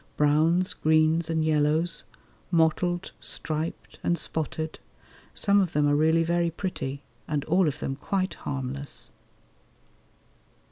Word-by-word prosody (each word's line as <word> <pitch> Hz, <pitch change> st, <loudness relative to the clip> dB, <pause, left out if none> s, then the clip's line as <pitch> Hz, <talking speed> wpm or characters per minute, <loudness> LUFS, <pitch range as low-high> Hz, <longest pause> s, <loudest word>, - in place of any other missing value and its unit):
Browns, 160 Hz, +5 st, +3 dB
greens, 160 Hz, +1 st, +2 dB
and 160 Hz, -1 st, +1 dB
yellows; 155 Hz, +2 st, +2 dB, 0.4 s
mottled, 175 Hz, +1 st, +1 dB
striped, 155 Hz, +1 st, -2 dB
and 175 Hz, -, +1 dB
spotted; 160 Hz, 0 st, -3 dB, 0.6 s
some 200 Hz, -1 st, +4 dB
of 180 Hz, -4 st, -1 dB
them 150 Hz, 0 st, +3 dB
are 145 Hz, -, +3 dB
really 160 Hz, +2 st, +3 dB
very 170 Hz, 0 st, +1 dB
pretty, 155 Hz, -5 st, -4 dB, 0.2 s
and 145 Hz, -2 st, -1 dB
all 180 Hz, +2 st, +3 dB
of 145 Hz, 0 st, -1 dB
them 135 Hz, -, -3 dB
quite 185 Hz, +5 st, -1 dB
harmless. 140 Hz, +1 st, -5 dB
160 Hz, 120 wpm, -27 LUFS, 150-170 Hz, 0.6 s, some